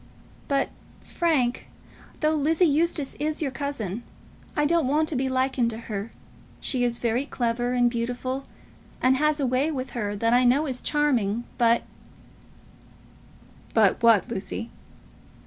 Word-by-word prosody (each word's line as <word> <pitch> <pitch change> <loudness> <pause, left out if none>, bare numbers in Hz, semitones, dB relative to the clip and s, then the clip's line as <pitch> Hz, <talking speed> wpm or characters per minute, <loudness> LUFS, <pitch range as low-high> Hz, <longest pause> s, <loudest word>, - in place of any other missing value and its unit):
But, 275 -1 +1 0.3
Frank, 280 -8 0 0.5
though 305 0 +3
Lizzie 315 +4 +3
Eustace 310 -2 +1
is 305 +1 -1
your 285 -4 -1
cousin, 245 -8 -4 0.5
I 295 - +2
don't 325 -2 +2
want 305 +3 +2
to 310 - -1
be 265 +1 0
likened 260 -2 +1
to 225 - -5
her. 215 -1 -5 0.5
She 255 -2 0
is 240 -1 0
very 235 +2 0
clever, 240 -1 -1
and 245 -1 +3
beautiful, 245 +3 -3 0.5
and 260 +1 +3
has 305 +1 +2
a 280 - +1
way 255 +4 +1
with 265 -4 -4
her 205 -4 -3
that 230 +3 +1
I 250 +1 +5
know 260 +5 +4
is 260 -4 -2
charming; 240 -8 +1 0.2
but 235 0 +4 0.9
" - - -26
"But 215 -4 +4
what, 230 -3 +5
Lucy?" 230 +1 -5
255 Hz, 145 wpm, -25 LUFS, 235-290 Hz, 0.9 s, I